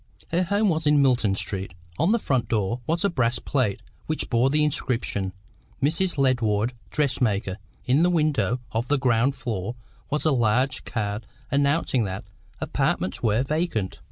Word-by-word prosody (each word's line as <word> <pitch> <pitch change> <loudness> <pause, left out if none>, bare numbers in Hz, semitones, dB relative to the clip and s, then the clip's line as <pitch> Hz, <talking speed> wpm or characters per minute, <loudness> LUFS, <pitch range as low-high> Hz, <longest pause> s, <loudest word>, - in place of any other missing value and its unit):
Her 170 +2 +1
home 200 +3 +2
was 160 -2 0
in 150 0 +5
Milton 120 -7 +3
Street. 95 -2 -5 0.2
On 175 - +3
the 230 - +4
front 130 - 0
door 115 +2 0
was 170 +4 +1
a - - +4
brass 120 -6 +1
plate 125 -9 -1 0.2
which 155 - -2
bore 120 +2 +4
the 150 +2 +3
inscription: 115 -9 -1 0.5
"Mrs. 165 +5 +1
Ledward, 120 -4 +2 0.2
Dressmaker;" 115 -8 0 0.3
in 135 +5 +3
the 175 - +4
window 145 - +1
of 115 +2 -1
the 145 - +2
ground 125 +1 +2
floor 115 -4 -3 0.3
was 150 +2 0
a 155 - +4
large 125 +1 +1
card 105 -2 -3 0.2
announcing 140 -3 +2
that 95 +1 -4 0.4
"Apartments" - - -1
were 110 +2 +2
vacant. 150 - -1
130 Hz, 155 wpm, -25 LUFS, 110-150 Hz, 0.5 s, in